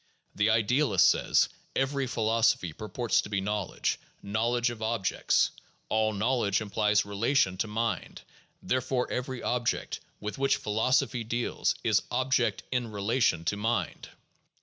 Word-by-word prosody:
The 105 Hz, +2 st, +2 dB
idealist 110 Hz, +4 st, +4 dB
says: -, -, +2 dB, 0.3 s
"Every 135 Hz, 0 st, 0 dB
philosophy 110 Hz, -7 st, +1 dB
purports 110 Hz, +5 st, 0 dB
to -, -, -9 dB
be 100 Hz, -1 st, 0 dB
knowledge, 105 Hz, -1 st, -2 dB, 0.2 s
knowledge 120 Hz, +4 st, 0 dB
of 115 Hz, -2 st, -9 dB
objects; 110 Hz, -4 st, +1 dB, 0.4 s
all 110 Hz, 0 st, +2 dB
knowledge 110 Hz, -1 st, +1 dB
implies 105 Hz, -1 st, +1 dB
relation 100 Hz, 0 st, +1 dB
to 105 Hz, -, -1 dB
mind; 115 Hz, +1 st, -3 dB, 0.4 s
there 130 Hz, -, +1 dB
fore 130 Hz, 0 st, -1 dB
every 125 Hz, 0 st, -3 dB
object 120 Hz, -1 st, -1 dB, 0.2 s
with 105 Hz, +5 st, -5 dB
which 135 Hz, 0 st, +3 dB
philosophy 115 Hz, +3 st, +1 dB
deals 120 Hz, +2 st, -1 dB
is -, -, +3 dB
object 130 Hz, -1 st, +1 dB
in 125 Hz, -3 st, -1 dB
relation 100 Hz, -4 st, +1 dB
to 100 Hz, -, 0 dB
mind. 115 Hz, +3 st, -2 dB
115 Hz, 130 wpm, -28 LUFS, 105-125 Hz, 0.4 s, idealist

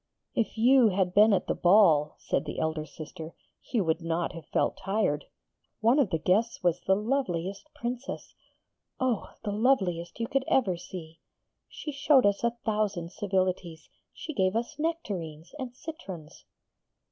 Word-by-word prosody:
'If 230 Hz, -1 st, -1 dB
you 250 Hz, +1 st, +6 dB
had 185 Hz, -2 st, 0 dB
been 210 Hz, +3 st, +6 dB
at 190 Hz, -3 st, +2 dB
the -, -, 0 dB
ball,' 175 Hz, -6 st, +5 dB
said 145 Hz, -, -1 dB
the 150 Hz, -, -5 dB
elder 155 Hz, -1 st, -1 dB
sister, 155 Hz, +2 st, -9 dB, 0.3 s
'you 230 Hz, -6 st, -1 dB
would 160 Hz, 0 st, 0 dB
not 165 Hz, +1 st, -1 dB
have 165 Hz, -3 st, -10 dB
felt -, -, 0 dB
tired. 195 Hz, -7 st, 0 dB, 0.5 s
One 235 Hz, +6 st, +4 dB
of 260 Hz, -9 st, +3 dB
the 165 Hz, -, +1 dB
guests 205 Hz, +8 st, +1 dB
was 175 Hz, 0 st, +2 dB
the 190 Hz, -, +3 dB
loveliest 200 Hz, -, -2 dB
Princess 245 Hz, +2 st, -5 dB, 0.7 s
oh, 255 Hz, -4 st, 0 dB
the 205 Hz, -, -2 dB
loveliest 195 Hz, -7 st, +1 dB
you 230 Hz, -, 0 dB, 0.2 s
ever 245 Hz, -8 st, +3 dB
could 175 Hz, -, -8 dB
see! 165 Hz, -3 st, -9 dB, 0.5 s
She 300 Hz, -, -6 dB
showed 280 Hz, -2 st, +4 dB
us 200 Hz, +2 st, +2 dB
a 235 Hz, 0 st, 0 dB
thousand 210 Hz, -6 st, -1 dB
civilities. 185 Hz, -4 st, -2 dB, 0.2 s
She 310 Hz, -, -7 dB
gave 190 Hz, -4 st, +1 dB
us 235 Hz, +5 st, -2 dB
nectarines 185 Hz, -, -3 dB
and 250 Hz, -2 st, -5 dB
citrons.' 195 Hz, -, -9 dB
195 Hz, 155 wpm, -28 LUFS, 170-235 Hz, 0.7 s, you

